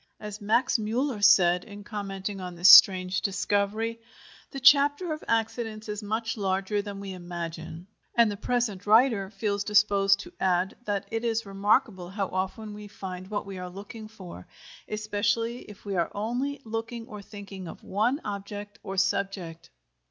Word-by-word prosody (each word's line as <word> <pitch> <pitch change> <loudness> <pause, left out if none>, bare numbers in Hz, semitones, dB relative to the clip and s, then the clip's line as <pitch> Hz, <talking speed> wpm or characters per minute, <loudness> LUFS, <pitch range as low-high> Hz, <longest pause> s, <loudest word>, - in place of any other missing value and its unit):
As 210 0 -7
Max 225 +4 +2
Müller 225 +1 -1
said, 180 -4 +6
in 205 -1 -11
commenting 200 -1 -5
on 180 -1 -6
this 175 +2 +5
strange 185 -1 +8
discovery: 205 +3 -1 0.5
"The 275 - -6
chapter 290 +5 +5
of 305 - -8
accidents 225 -1 -1
is 210 0 -4
much 225 +2 -2
larger 195 +1 0
than 200 -1 -7
we 195 -1 -6
imagine," 170 -1 -7 0.3
and 235 -3 +5
the - - -4
present 210 -3 -2
writer 220 -3 +4
feels 200 0 -2
disposed 200 -1 +4
to - - -12
add 185 0 +1
that 205 -1 -1
it 225 +1 -2
is 230 -1 0
remarkable 195 -1 +1
how 195 0 -3
often 190 +3 -3
we 210 0 -9
find 185 -2 -8
what 205 -1 -3
we 195 -2 -7
are 180 0 -6
looking 205 +4 -9
for, 185 - -11 0.4
especially 215 +3 -1
if 210 - -13
we 200 -1 -3
are 170 -2 +1
only 245 +7 -2
looking 225 +1 -5
or 210 -3 -9
thinking 200 -2 -9
of - - -10
one 230 +8 0
object 205 0 -6
or 195 0 -6
subject. 195 -3 -1
205 Hz, 160 wpm, -27 LUFS, 190-225 Hz, 0.5 s, strange